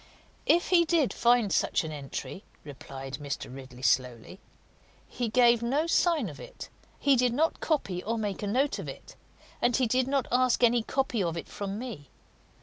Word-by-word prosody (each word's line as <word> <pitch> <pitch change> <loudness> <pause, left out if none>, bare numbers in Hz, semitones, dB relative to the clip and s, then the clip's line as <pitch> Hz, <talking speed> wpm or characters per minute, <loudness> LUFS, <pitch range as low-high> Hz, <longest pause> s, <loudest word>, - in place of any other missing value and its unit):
"If 345 - +3
he 350 -2 +5
did 325 -5 +1
find 235 -4 +3
such - - +1
an 160 - -5
entry," 145 +6 -6 0.2
replied 135 -1 -8
Mr. 140 -3 -5
Ridley 130 -1 -11
slowly, 125 - 0 0.7
"he 240 -2 -3
gave 240 0 +4
no 275 +7 0
sign 335 -1 +2
of - - -9
it; - - -10 0.3
he 280 -1 +3
did 250 -1 +2
not 315 +6 +1
copy 200 - -1
or 230 +2 -2
make 205 -3 -3
a 205 - -3
note 265 +7 +1
of - - -6
it, - - -11 0.5
and 240 -1 +2
he 260 - +2
did 255 +2 +1
not 275 -2 0
ask 250 0 +2
any 240 0 +4
copy 245 -1 -1
of 170 -2 -1
it - - -6
from 200 0 -5
me. 215 - -7
235 Hz, 180 wpm, -28 LUFS, 170-265 Hz, 0.7 s, he